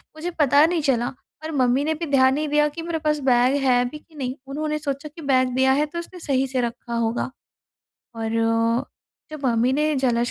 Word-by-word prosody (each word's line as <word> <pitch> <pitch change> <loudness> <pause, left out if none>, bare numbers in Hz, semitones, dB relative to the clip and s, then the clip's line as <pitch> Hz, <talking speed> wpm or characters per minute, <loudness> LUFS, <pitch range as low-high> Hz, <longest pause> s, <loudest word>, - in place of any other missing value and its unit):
मुझे 330 +3 -4
पता 290 +1 +5
नहीं 335 -1 0
चला 245 -4 +1 0.4
और 320 - -4
मम्मी 255 +1 +2
ने 315 +1 0
भी 335 +2 -4
ध्यान 260 -1 +5
नहीं 305 +2 -1
दिया 295 0 +3
कि 330 +3 -7
मेरे 330 -1 -3
पास 300 -1 0
बैग 250 +3 +4
है 245 -2 +4
भी 300 - -8
कि 315 0 -24
नहीं? 260 -2 -4
उन्होंने 305 +2 -2
सोचा 285 0 -4
कि 330 - -9
बैग 260 -2 +2
दिया 265 0 +4
है 295 +2 +2
तो 340 +3 -6
उसने 355 +1 -9
सही 270 -4 0
से 260 -1 -1
रखा 235 0 -5
होगा। 230 +2 -1 0.9
और 225 -1 -3 1.0
जब 300 -3 -8
मम्मी 235 +1 +2
ने 300 +2 +1
ज्वेलर्स 240 -2 +1
275 Hz, 210 wpm, -23 LUFS, 250-305 Hz, 1.0 s, पता